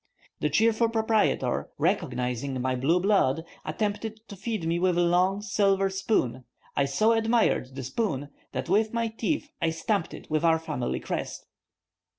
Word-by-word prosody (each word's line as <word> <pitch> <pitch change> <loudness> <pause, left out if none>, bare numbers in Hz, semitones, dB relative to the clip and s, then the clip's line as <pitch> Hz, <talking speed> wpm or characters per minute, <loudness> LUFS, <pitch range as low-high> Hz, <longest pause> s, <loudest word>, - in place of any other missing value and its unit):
The 150 - +1
cheerful 225 +7 +3
proprietor, 220 -1 +1
recognizing 125 +1 -1
my 130 +1 0
blue 150 +8 +2
blood, 175 -6 +2 0.2
attempted 210 +6 -3
to 200 - -7
feed 205 -2 -3
me 170 +1 +1
with 180 -1 +2
a - - +4
long, 185 +4 +2
silver 195 -1 +2
spoon; 190 - 0 0.3
I 140 - +3
so 175 +12 +2
admired 225 - +2
the 135 - -5
spoon 145 - -2 0.2
that - - -3
with 215 +5 +2
my 230 -1 0
teeth 285 +7 -2
I 165 - +2
stamped 165 +3 -1
it - - -12
with 155 +1 0
our 165 -1 +5
family 150 -7 -3
crest. - - -4
185 Hz, 160 wpm, -27 LUFS, 145-220 Hz, 0.3 s, our